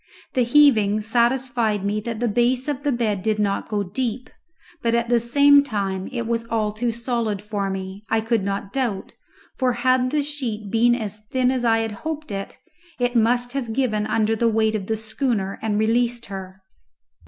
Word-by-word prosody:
The 255 - +2
heaving 235 -5 +4
satisfied 235 -2 +1
me 205 +1 0
that 225 +1 -5
the 240 - +1
base 245 +4 +1
of 285 -2 -2
the 290 -1 0
bed 220 -6 0
did 215 +1 0
not 200 -2 -1
go 210 -2 0
deep, 235 +5 -3 0.5
but 230 0 +1
at 235 0 0
the 240 -1 +4
same 285 +4 +5
time 195 -7 -3
it 235 -2 -3
was 230 0 -1
all 220 -2 0
too 235 +3 -1
solid 235 -3 -2
for 205 -1 -3
me, 190 +1 -6
I 225 - +2
could 225 0 0
not 195 +1 -3
doubt, 240 -8 -2 0.5
for 255 -2 +2
had 255 +1 +2
the 295 +1 0
sheet 235 -9 -4
been 240 +1 +4
as 215 -3 -5
thin 255 -1 +2
as 255 -2 -1
I 225 -1 +3
had 225 -1 -2
hoped 310 -4 -5
it, 195 0 -5 0.4
it 245 0 0
must 245 +2 +2
have 245 -5 -3
given 220 -4 0
under 220 0 +1
the 230 +1 +2
weight 220 0 +2
of 200 -3 -3
the 220 - -1
schooner 220 -3 -2
and 215 -2 -1
released 235 +2 +1
her. 190 -1 -8
230 Hz, 190 wpm, -22 LUFS, 210-245 Hz, 0.5 s, same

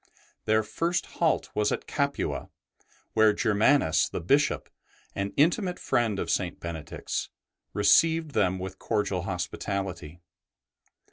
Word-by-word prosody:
Their 110 0 +3
first 170 +11 -1 0.2
halt 165 - +2
was 105 0 +1
at - - -2
Capua, 140 -1 -2 0.6
where 110 -1 +5
Germanus 105 - +3
the - - -4
Bishop, 140 - +1 0.5
an 100 0 -3
intimate 175 +5 +2
friend 115 -4 0
of - - -2
St. - - -1
Benedict's, 85 -2 -5 0.4
received 160 +10 +4
them 95 -6 +1
with 95 +1 -7
cordial 100 -3 -1
hospitality. 95 -2 -4
105 Hz, 115 wpm, -27 LUFS, 95-145 Hz, 0.6 s, where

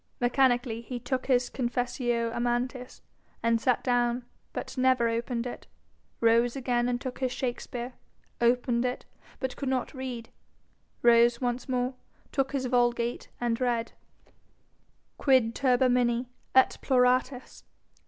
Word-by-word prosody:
Mechanically 245 -2 +2
he 245 +1 -6
took 255 +1 -3
his 250 -2 +3
Confessio 240 -1 -1
Amantis, 245 +1 -2 0.4
and 230 -1 +2
sat 250 +1 +1
down, 245 -1 +1 0.3
but - - -6
never 255 -2 +3
opened 235 +1 -2
it; 245 - -7 0.5
rose 235 +2 +3
again 245 -2 0
and 245 0 -1
took 255 -1 -6
his 260 -2 0
Shakespere, 245 -1 -4 0.5
opened 240 0 +2
it, 250 0 -3 0.3
but 260 -2 -3
could 275 - -3
not 260 +2 -1
read; 255 -4 -6 0.7
rose 235 0 +5
once 245 +1 -2
more, 250 0 0 0.4
took 270 -1 0
his 270 -2 -1
Vulgate, 240 -1 0
and 240 0 -1
read: 235 -2 0 1.3
'Quid 255 -5 +3
turbamini, 250 -2 +2 0.3
et 260 - +5
ploratis? 255 0 +1
245 Hz, 125 wpm, -28 LUFS, 240-255 Hz, 1.3 s, rose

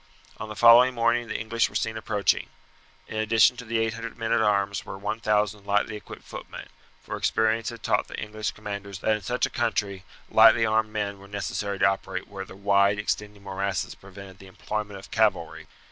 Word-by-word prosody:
On 110 - -7
the 105 - -7
following 120 +3 +7
morning 120 0 +1
the 110 - -3
English 115 +1 0
were - - -16
seen 110 - -1
approaching. 105 -4 0 0.6
In 110 - -6
addition 110 +3 +4
to 125 - -8
the 115 +1 -1
800 115 0 -3
men 115 -1 -3
at 115 - +3
arms 100 -2 +1
were - - -8
1000 105 0 0
lightly 105 +2 0
equipped 105 - -10
footmen, - - -9 0.3
for - - -5
experience 110 +1 +1
had 115 -3 -10
taught - - +1
the - - -7
English 110 -1 -4
commanders 100 -2 -6
that 110 - +2
in - - -12
such 120 +7 0
a - - -6
country 100 -5 -1 0.2
lightly 115 - +6
armed 110 0 +1
men 100 -2 -3
were 100 - -13
necessary 100 0 -3
to - - +3
operate 95 0 -1
where 100 -1 -7
the 95 - -12
wide 100 0 +3
extending 105 0 -3
morasses 100 0 -3
prevented 95 -1 -13
the 95 - -13
employment 105 +2 -5
of 95 - -13
cavalry. 85 -8 0
105 Hz, 190 wpm, -26 LUFS, 100-110 Hz, 0.6 s, following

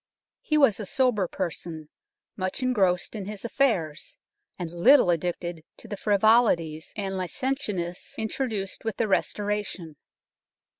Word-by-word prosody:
He 305 - +1
was 270 -9 +4
a 210 - -4
sober 245 -7 +2
person, 165 -4 -5 0.5
much 185 +6 -3
engrossed 195 -8 +2
in 205 -3 -4
his 210 +1 -6
affairs, 205 - 0 0.4
and 175 -3 -5
little 185 +4 +6
addicted 175 -1 -2
to - - -11
the 205 - -4
frivolities 200 -7 +3
and 195 -2 -3
licentiousness 190 -4 -3
introduced 220 -3 -3
with 225 -3 -3
the 230 - +1
Restoration. 200 -5 -1
195 Hz, 120 wpm, -26 LUFS, 175-225 Hz, 0.5 s, little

